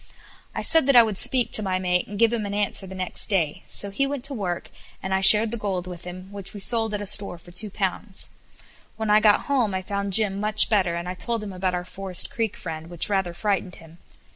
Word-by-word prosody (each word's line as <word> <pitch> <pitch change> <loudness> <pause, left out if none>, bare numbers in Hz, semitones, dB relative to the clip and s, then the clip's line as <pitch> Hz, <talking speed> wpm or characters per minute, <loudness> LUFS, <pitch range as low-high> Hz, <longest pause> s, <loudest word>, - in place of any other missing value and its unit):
I - - -4
said 320 -4 +2
that 275 - +3
I 240 - +8
would 215 -4 -3
speak 255 -2 +5
to - - +4
my 190 -2 -2
mate 180 -1 -1
and 205 - -8
give 230 +1 +2
him 220 -3 -3
an 200 - -5
answer 205 -1 -1
the 190 - -10
next 185 -1 +1
day; 170 -8 -1
so 200 - 0
he 275 +7 -1
went 280 -2 -6
to 275 +1 -3
work, 185 -8 -5 0.3
and 190 - -4
I 190 - 0
shared 215 +3 +8
the 235 - -4
gold 190 -4 -4
with 180 -2 -9
him, 185 +2 -10
which 200 0 -7
we - - -7
sold 225 +1 +3
at 205 - -5
a - - -7
store 200 -2 0
for 170 +1 -18
two 205 +4 0
pounds. 195 +1 -5 0.7
When 220 -1 -2
I 210 - +5
got 210 -1 +3
home 245 -8 -1
I 185 - -4
found 200 0 -4
Jim 200 -1 +3
much 215 +1 +4
better, 185 -5 +1
and 170 +1 -6
I 180 - -4
told 230 +4 -4
him 200 -2 -8
about 185 0 -3
our 175 0 -5
Forest 185 -1 -2
Creek 225 -3 -3
friend, 160 -2 -8
which 175 +2 +3
rather 190 -4 -2
frightened 195 -1 -3
him. 165 +1 -17
195 Hz, 250 wpm, -23 LUFS, 180-215 Hz, 0.7 s, I